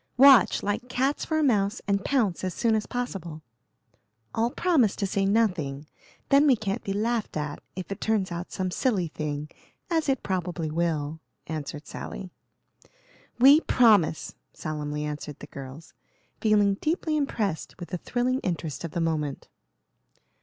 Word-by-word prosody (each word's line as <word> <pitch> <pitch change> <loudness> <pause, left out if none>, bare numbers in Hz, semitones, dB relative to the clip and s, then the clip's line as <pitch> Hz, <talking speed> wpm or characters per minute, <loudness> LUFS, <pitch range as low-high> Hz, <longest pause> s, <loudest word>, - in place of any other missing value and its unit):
"Watch, 270 -1 +7
like 220 +5 -2
cats 265 +3 0
for 315 - 0
a 310 - +2
mouse, 210 -4 +2
and 200 -1 +1
pounce 220 -11 +1
as 185 -2 -2
soon 230 -2 +2
as 215 -1 0
possible. 180 -11 -5 0.9
All 230 +1 +1
promise 265 - +2
to 200 - -1
say 195 0 0
nothing; 175 -10 +1 0.4
then 280 +2 +6
we 265 - +6
can't 205 -3 -3
be 195 - -3
laughed 220 -1 -1
at 150 -1 -4
if 185 0 -6
it 195 - -5
turns 210 -4 0
out 175 +1 -5
some 185 -1 -2
silly 190 -7 0
thing, 150 -1 -4 0.4
as 320 -3 +1
it 265 -2 0
probably 180 -4 -2
will," 160 -2 -1 0.3
answered 150 -1 -5
Sally. 185 -2 -7 1.1
"We 275 +5 +8
promise!" 210 - +3 0.2
solemnly 150 -1 -4
answered 150 -1 -5
the - - -9
girls, 140 +2 -10 0.5
feeling 205 -3 +3
deeply 315 0 0
impressed 220 - -2
with 175 - -7
the 180 - -3
thrilling 250 +5 0
interest 165 - -3
of 165 - -5
the 170 - -1
moment. 155 -4 -2
195 Hz, 155 wpm, -27 LUFS, 160-240 Hz, 1.1 s, We